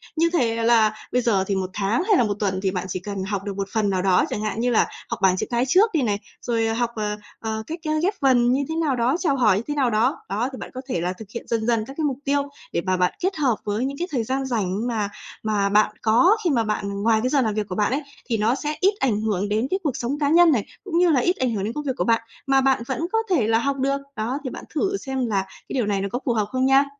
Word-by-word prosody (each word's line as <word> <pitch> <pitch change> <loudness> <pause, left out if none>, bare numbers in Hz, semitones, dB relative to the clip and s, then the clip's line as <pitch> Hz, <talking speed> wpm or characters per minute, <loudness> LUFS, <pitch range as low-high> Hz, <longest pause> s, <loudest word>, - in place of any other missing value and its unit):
Như 335 +1 +3
thể 230 -7 +1
là 225 -2 +4 0.2
bây 250 - +2
giờ 205 -5 +2
thì 200 - 0
một 190 -1 -2
tháng 210 - 0
hay 410 -1 +3
là - - +4
một 210 -2 0
tuần 190 -3 0
thì 190 - +1
bạn 185 0 -3
chỉ 185 - -3
cần 195 0 -5
học 195 0 -3
được 200 -1 -4
một 195 -1 -2
phần 215 -3 +1
nào 185 -2 0
đó, 185 -1 +3
chẳng 210 - -3
hạn 215 0 -2
như 245 +2 +1
là 225 - +3 0.2
học - - -3
bảng 185 -1 +4
chữ - - -1
cái 240 +1 +1
trước 395 - +4
đi 315 - +2
này, 210 -5 0 0.2
rồi, 230 -2 0
ờ, 225 - 0
học, 235 +1 0
ờ, 210 -1 -2 0.2
ờ, 220 -1 -3
cách, 330 +2 -5
ơ, - - +1
ghép 390 +4 +2
vần 245 -3 +4
như 275 +2 +1
thế 320 - -2
nào 315 -5 +1
đó, 245 +3 +1
chào 315 -6 +1
hỏi 215 -7 +4
như 210 - -2
thế 295 - -2
nào 270 -4 +2
đó. 220 +1 +2
Đó, 220 +7 -1
thì 260 - -8
bạn - - -8
có 255 - -5
thể 175 - -1
là 180 +1 -1
thực 215 +4 -10
hiện 235 - -6
dần 225 -2 -1
dần 230 -2 +1
các 270 - -9
cái 320 - -1
mục 275 -3 -1
tiêu, 285 +1 +2 0.3
để 170 - +1
bà 185 0 0
bạn 180 0 +2
kết 380 +2 0
hợp 265 -6 +2
với 210 +4 -1
những 275 +1 -4
cái 350 - -2
thời 250 -5 0
gian 265 +4 -2
rảnh 220 -2 -1
mà 215 -4 -1 0.3
mà 205 -2 +1
bạn 210 +1 +3
có, 345 - +4
khi 345 - +2
mà 240 -5 +2
bạn 200 -2 -2
ngoài 225 0 +4
cái 255 - +1
giờ 275 0 +3
làm 220 -4 0
việc 210 -1 -2
của 180 - -5
bạn 210 +2 +1
ấy, 275 +3 0 0.2
thì 230 -3 -1
nó 220 +4 +2
sẽ 300 +2 -3
ít 390 +2 +4
ảnh 220 -6 +1
hưởng 205 -2 -1
đến 220 +4 +1
cái 380 - +1
cuộc 290 -6 -1
sống 265 +5 -2
cá 285 -2 +1
nhân 340 +1 +6
này, 230 -8 +1 0.2
cũng 360 -4 -2
như 355 0 +5
là 290 -5 +4
ít 355 +6 +2
ảnh 255 -2 0
hưởng 200 -3 -2
đến 220 +3 -2
công 295 - -4
việc 270 -3 -1
của - - +1
bạn, 230 -1 +2 0.3
mà 270 0 +4
bạn 265 -3 +2
vẫn 265 - -2
có 450 - +2
thể 285 - +2
là 225 0 +3
học 275 +3 -1
được. 275 +1 +1 0.2
Đó, 230 +6 -2
thì 260 - -3
bạn - - -8
thử 390 +5 0
xem 265 -6 -3
là 200 -3 +1
cái - - -13
điều 250 -4 +1
này 200 -2 0
nó 200 - -1
có 245 - -1
phù 245 - +2
hợp 215 -2 +1
không 260 0 +1
nha. 270 +1 +5
235 Hz, 310 wpm, -23 LUFS, 210-275 Hz, 0.3 s, nhân